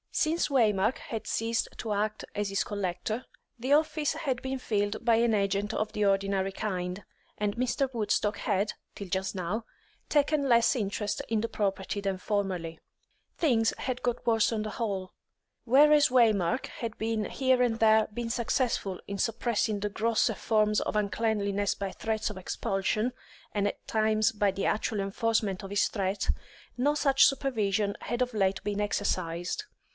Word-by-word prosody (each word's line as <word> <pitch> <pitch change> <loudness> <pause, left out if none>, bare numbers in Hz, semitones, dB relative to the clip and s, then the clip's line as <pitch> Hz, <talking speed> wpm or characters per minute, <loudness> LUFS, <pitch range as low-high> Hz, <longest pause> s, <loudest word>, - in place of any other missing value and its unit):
Since 320 +1 +1
Waymark 220 -4 +2
had 225 -2 -6
ceased 225 0 -1
to 220 -2 -2
act 210 +1 -1
as 205 -1 -1
his 195 - 0
collector, 205 +4 -3 0.4
the 255 +4 -2
office 305 -1 +2
had 280 -6 -2
been 265 0 -3
filled 205 -3 -1
by 230 -2 +5
an 230 0 +3
agent 200 +1 0
of 215 0 -2
the 210 - 0
ordinary 195 -1 +1
kind, 185 -2 -4 0.3
and 205 -1 -1
Mr. 255 +3 0
Woodstock 210 -1 0
had, 205 0 0 0.2
till 200 - -7
just 190 +2 -2
now, 190 +5 -2 0.5
taken 290 -1 +2
less 235 +2 +5
interest 205 -2 -2
in 225 -1 +1
the 230 - -1
property 200 -1 -2
than 195 -1 -1
formerly. 185 -5 -2 0.6
Things 230 -8 +2
had 255 -1 -3
got 245 -1 -2
worse 225 -1 +3
on 220 -2 -1
the 215 - -4
whole. 195 -6 -3 0.5
Whereas 290 +4 +6
Waymark 230 -3 +3
had 230 -2 -6
here 230 +4 +1
and 235 -2 +1
there 220 -1 +5
been 230 +1 -3
successful 235 -5 0
in 200 0 -4
suppressing 220 -1 0
the 210 +1 -2
grosser 220 +2 +1
forms 215 -1 +2
of - - -3
uncleanliness 205 -1 0
by 195 -1 -4
threats 220 +1 -2
of 210 - -7
expulsion, 195 +5 -1 0.4
and 205 -1 +1
at - - -6
times 215 0 +2
by 205 -1 +2
the 195 0 -2
actual 215 0 0
enforcement 200 0 0
of 195 - -6
his 200 +1 +2
threat, 195 -1 -2 0.5
no 285 +4 +2
such 275 -2 +4
supervision 215 -7 0
had 240 +1 -3
of 250 -1 0
late 195 -2 +1
been 205 0 -1
exercised. 185 - -1
215 Hz, 160 wpm, -29 LUFS, 200-235 Hz, 0.6 s, Whereas